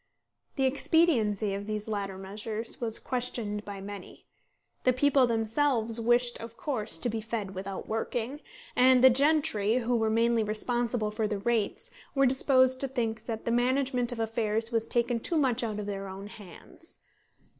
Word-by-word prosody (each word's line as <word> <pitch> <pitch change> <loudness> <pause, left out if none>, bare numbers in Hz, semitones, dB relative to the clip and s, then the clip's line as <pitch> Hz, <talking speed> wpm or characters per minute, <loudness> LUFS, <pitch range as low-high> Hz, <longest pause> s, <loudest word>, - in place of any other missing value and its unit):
The 270 - 0
expediency 255 - +2
of 200 +1 -5
these 215 0 -4
latter 200 -3 -3
measures 210 +5 -5
was 225 -2 0
questioned 235 -5 -3
by 200 -2 -7
many. 200 -1 -9 0.6
The 255 - +4
people 270 0 +3
themselves 230 0 +1
wished 240 +1 +2
of 230 0 -9
course 235 - 0
to 205 - -2
be 225 -1 -2
fed 215 -3 -4
without 190 0 -6
working; 235 +5 -3 0.3
and 255 0 +5
the 260 - +9
gentry, 275 -6 +2
who 245 0 0
were 225 -1 +1
mainly 230 +1 +2
responsible 225 +1 0
for 215 0 -1
the 210 -1 -2
rates, 220 0 -1 0.2
were 275 0 +4
disposed 260 0 +3
to 275 - 0
think 230 -4 -3
that 225 -2 -4
the 235 - 0
management 250 0 +1
of 240 - -5
affairs 225 0 -1
was 225 -1 0
taken 240 0 +1
too 330 +8 -1
much 255 -5 +1
out 215 -3 -3
of 210 - -4
their 195 -1 -4
own 190 +1 -8
hands. 205 - -13
230 Hz, 165 wpm, -29 LUFS, 210-250 Hz, 0.6 s, the